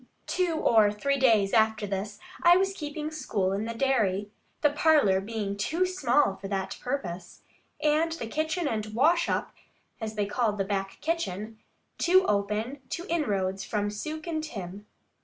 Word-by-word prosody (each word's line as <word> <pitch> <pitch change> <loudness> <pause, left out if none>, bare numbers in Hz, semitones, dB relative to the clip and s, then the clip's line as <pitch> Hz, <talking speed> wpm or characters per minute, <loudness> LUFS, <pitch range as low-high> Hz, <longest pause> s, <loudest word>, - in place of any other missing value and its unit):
Two 360 -3 0
or 220 -8 +4
three 275 +7 -1
days 220 -6 +4
after 220 -2 +3
this, 200 +1 -4 0.2
I 350 0 +7
was 385 +1 +1
keeping 300 -2 -5
school 200 -11 -1
in 205 +2 -2
the 230 0 -4
dairy, 210 -6 +1 0.3
the 295 - +4
parlour 295 -11 +4
being 205 -1 -3
too 320 - 0
small 295 - +2
for 195 - -7
that 195 -1 -3
purpose, 190 -10 -5 0.4
and 310 +2 +2
the 325 - -5
kitchen 315 +7 -1
and 215 -4 -3
"wash 330 +7 +3
up" - - -1 0.5
(as 220 -1 -5
they 205 -1 0
called 210 +1 0
the 195 - 0
back 195 -1 -3
kitchen) 225 - -3 0.4
too 375 +2 +5
open 210 +6 -1
to 345 - -4
inroads 195 - 0
from 205 -1 -1
Suke 310 +9 -5
and 315 -2 -2
Tim. 200 - -7
225 Hz, 160 wpm, -28 LUFS, 205-310 Hz, 0.5 s, I